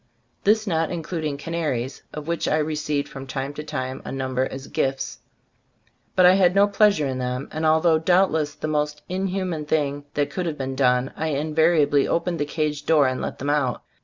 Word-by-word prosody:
This 215 Hz, +1 st, +4 dB
not 165 Hz, -5 st, 0 dB
including 160 Hz, -3 st, -3 dB
canaries, 145 Hz, -5 st, -3 dB
of 150 Hz, 0 st, -7 dB
which 170 Hz, -1 st, -1 dB
I 155 Hz, -, +2 dB
re 155 Hz, 0 st, -1 dB
ceived 150 Hz, -1 st, -1 dB
from 135 Hz, 0 st, -9 dB
time 135 Hz, +1 st, -4 dB
to 150 Hz, -, -6 dB
time 130 Hz, -3 st, -4 dB
a -, -, -6 dB
number 130 Hz, -1 st, -1 dB
as 135 Hz, 0 st, -8 dB
gifts; 135 Hz, -3 st, -2 dB, 1.0 s
but 185 Hz, -, +6 dB
I 180 Hz, -, +8 dB
had 185 Hz, -1 st, +4 dB
no 200 Hz, +1 st, +6 dB
pleasure 200 Hz, -6 st, +3 dB
in 130 Hz, -1 st, -2 dB
them, 125 Hz, +1 st, -3 dB
and 155 Hz, +1 st, -1 dB
although 160 Hz, +1 st, +4 dB
doubtless 160 Hz, -4 st, +2 dB
the 155 Hz, -, -4 dB
most 150 Hz, -1 st, -1 dB
in 190 Hz, +2 st, -1 dB
human 180 Hz, -4 st, -2 dB
thing 145 Hz, -2 st, -1 dB
that 145 Hz, -1 st, 0 dB
could 180 Hz, -2 st, -2 dB
have 155 Hz, -2 st, -3 dB
been 135 Hz, -1 st, -3 dB
done, 125 Hz, -1 st, +2 dB
I 160 Hz, -, -2 dB
invariably 155 Hz, -1 st, +2 dB
opened 170 Hz, 0 st, -1 dB
the 145 Hz, -, +1 dB
cage 150 Hz, -1 st, -2 dB
door 155 Hz, -3 st, +5 dB
and 130 Hz, -1 st, -1 dB
let -, -, -4 dB
them 145 Hz, +2 st, -1 dB
out. 140 Hz, -4 st, 0 dB
150 Hz, 200 wpm, -23 LUFS, 140-165 Hz, 1.0 s, I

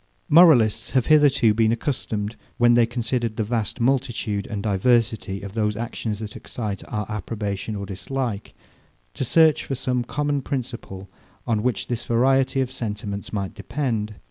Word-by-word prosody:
Moralists 150 Hz, -, +6 dB
have 125 Hz, -, +2 dB
hitherto 140 Hz, -7 st, +5 dB
been 110 Hz, 0 st, +3 dB
accustomed, 115 Hz, -4 st, -2 dB, 0.2 s
when 120 Hz, 0 st, +5 dB
they 120 Hz, -1 st, +4 dB
considered 120 Hz, -1 st, -2 dB
the 110 Hz, -, 0 dB
vast 110 Hz, +1 st, -2 dB
multitude 120 Hz, -5 st, 0 dB
and 100 Hz, -2 st, -4 dB
diversity 105 Hz, -1 st, +1 dB
of 100 Hz, -1 st, -7 dB
those 105 Hz, -2 st, 0 dB
actions 115 Hz, -2 st, -3 dB
that 105 Hz, -1 st, -7 dB
excite 105 Hz, -5 st, -5 dB
our 105 Hz, 0 st, -3 dB
approbation 105 Hz, 0 st, -4 dB
or 100 Hz, -1 st, -4 dB
dislike, 105 Hz, +3 st, -4 dB, 0.6 s
to -, -, -3 dB
search 160 Hz, +3 st, +4 dB
for 135 Hz, -, -3 dB
some 125 Hz, -1 st, -1 dB
common 145 Hz, +2 st, -1 dB
principle, 120 Hz, -8 st, -5 dB, 0.4 s
on 115 Hz, -3 st, 0 dB
which 125 Hz, +1 st, -1 dB
this 120 Hz, -1 st, -3 dB
variety 135 Hz, +3 st, +2 dB
of 130 Hz, -1 st, -2 dB
sentiments 105 Hz, -4 st, -5 dB
might 100 Hz, -3 st, -3 dB
depend. 110 Hz, -1 st, -3 dB
115 Hz, 150 wpm, -23 LUFS, 105-130 Hz, 0.6 s, Moralists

